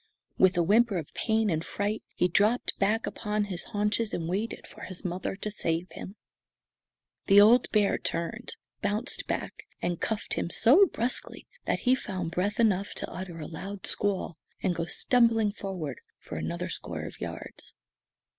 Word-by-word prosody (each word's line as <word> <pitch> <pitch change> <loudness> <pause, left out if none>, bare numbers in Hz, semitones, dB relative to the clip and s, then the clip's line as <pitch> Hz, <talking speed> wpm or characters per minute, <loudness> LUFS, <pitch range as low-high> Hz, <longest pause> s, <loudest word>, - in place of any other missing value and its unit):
With 185 -1 +5
a 170 - +4
whimper 210 +3 +4
of 160 -4 -6
pain 220 -2 +1
and 160 0 0
fright 205 +4 -2
he 180 - +3
dropped 210 +7 +2
back 215 +3 +2
upon 210 -1 -1
his 190 -4 -3
haunches 210 +1 0
and 165 -2 -3
waited 200 +6 -2
for - - -13
his 185 +1 -7
mother 180 +2 -2
to 210 +2 -4
save 170 -3 -1
him. 190 - -8 1.1
The 200 0 +8
old 230 +4 +6
bear 210 -2 +2
turned, 220 +8 -3 0.3
bounced 215 +5 -1
back, - - -4
and 175 -1 -2
cuffed 220 -2 -2
him - - -1
so 290 - +6
bruskly 245 -4 -2 0.2
that - - 0
he 255 - +4
found 185 -9 -3
breath 200 +6 -1
enough 200 -3 +2
to - - -4
utter 180 -2 -6
a 155 - -6
loud 195 +4 -6
squall 195 -5 0 0.2
and 185 - +2
go 165 -1 -2
stumbling 225 +2 +3
forward 185 - -5 0.2
for - - -9
another 80 +2 -3
score - - -4
of - - -8
yards. - - -7
200 Hz, 165 wpm, -28 LUFS, 175-220 Hz, 1.1 s, The